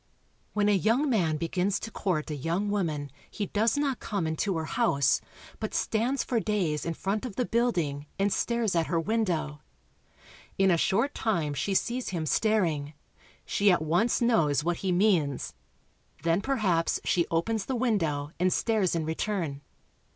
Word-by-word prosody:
When 205 -1 +2
a - - +4
young 230 - +2
man 165 -9 +2
begins 180 +5 0
to 225 - -6
court 170 -7 -2
a - - -2
young 170 +8 -1
woman 155 -8 -2 0.2
he 210 - -3
does 220 +7 +1
not 280 -4 0
come 200 -6 -2
into 160 +4 -1
her 160 - -2
house, 140 -1 +2 0.4
but 215 - -4
stands 240 +5 0
for 240 -3 0
days 185 -9 -1
in 165 - -2
front 200 +5 -2
of 245 -6 -5
the 250 - 0
building, 170 -13 0
and 200 0 +1
stares 235 -5 0
at 165 -1 +2
her 165 +1 +1
window. 165 -7 -1 1.0
In 195 -1 +4
a - - +5
short 230 - +1
time 165 -10 -1
she 195 +7 -1
sees 245 +5 0
him 170 -4 -2
staring. 160 -7 +1 0.5
She 205 0 +2
at 175 - +2
once 175 +12 +1
knows 155 - +3
what 175 +1 0
he 190 - -1
means. 175 -8 +1 0.7
Then 165 +3 +2
perhaps 205 -10 +1
she 170 -2 +1
opens 195 +6 0
the 265 - -1
window 165 - 0
and 185 +1 +3
stares 215 -6 +1
in 160 -2 -1
return. 160 -3 -2
190 Hz, 165 wpm, -28 LUFS, 160-220 Hz, 1.0 s, a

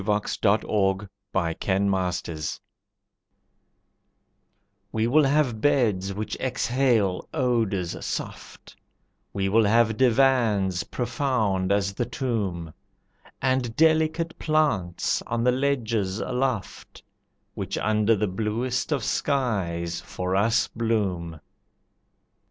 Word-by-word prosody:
The 105 +1 +2 0.2
Death 105 +1 +3
of 95 -1 +1 0.2
the 85 -4 0
Lovers 90 -5 -1 2.3
We 110 0 0
will 145 +5 +4
have 135 -6 +1
beds 105 -9 +2
which 105 +1 -4
exhale 120 -6 +1
odours 115 - 0
soft, - - -6 0.6
We 95 -1 -1
will 110 +3 +4
have 110 +1 +3
divans 115 -8 +3
profound 110 -8 -1
as 100 -1 +1
the 120 +3 -2
tomb, 95 - -3 0.7
And 130 -3 0
delicate 160 +1 +2
plants 145 - 0
on 115 0 -1
the 125 - +4
ledges 115 -7 0
aloft, 125 -4 -3 0.5
Which 100 -2 -4
under 110 +1 +2
the 105 - 0
bluest 115 +8 -2
of 145 -3 0
skies 90 - -1
for 90 +1 -3
us 110 +4 +2
bloom. 95 -8 -2
110 Hz, 100 wpm, -25 LUFS, 95-125 Hz, 2.3 s, will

